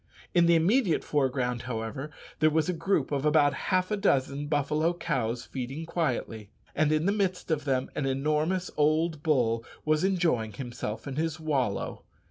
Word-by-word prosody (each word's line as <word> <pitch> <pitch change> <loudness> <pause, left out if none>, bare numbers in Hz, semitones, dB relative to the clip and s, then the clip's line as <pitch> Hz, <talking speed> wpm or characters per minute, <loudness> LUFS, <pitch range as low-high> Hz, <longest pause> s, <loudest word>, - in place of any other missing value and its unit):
In 175 -1 +5
the 170 - +5
immediate 185 +3 +3
foreground, 130 -4 0
however, 115 +5 -4 0.3
there 155 - +5
was 160 +2 +1
a 180 - 0
group 165 -4 0
of 140 -1 0
about 150 -2 +4 0.2
half 185 +1 +1
a - - +2
dozen 140 -6 +1
buffalo 155 +3 +1
cows 120 -7 -2
feeding 135 +5 -5
quietly, 130 - -2 0.2
and 155 0 +2
in 155 +1 +2
the 200 - +3
midst 190 -4 -1
of 150 -2 0
them 130 -2 0
an 135 - -2
enormous 155 +7 0
old 155 +1 +2
bull 120 -7 +1 0.2
was 155 +1 +2
enjoying 165 - +1
himself 115 -2 -5
in 135 0 -5
his 160 0 -1
wallow. 135 -10 -1
150 Hz, 165 wpm, -28 LUFS, 130-165 Hz, 0.3 s, In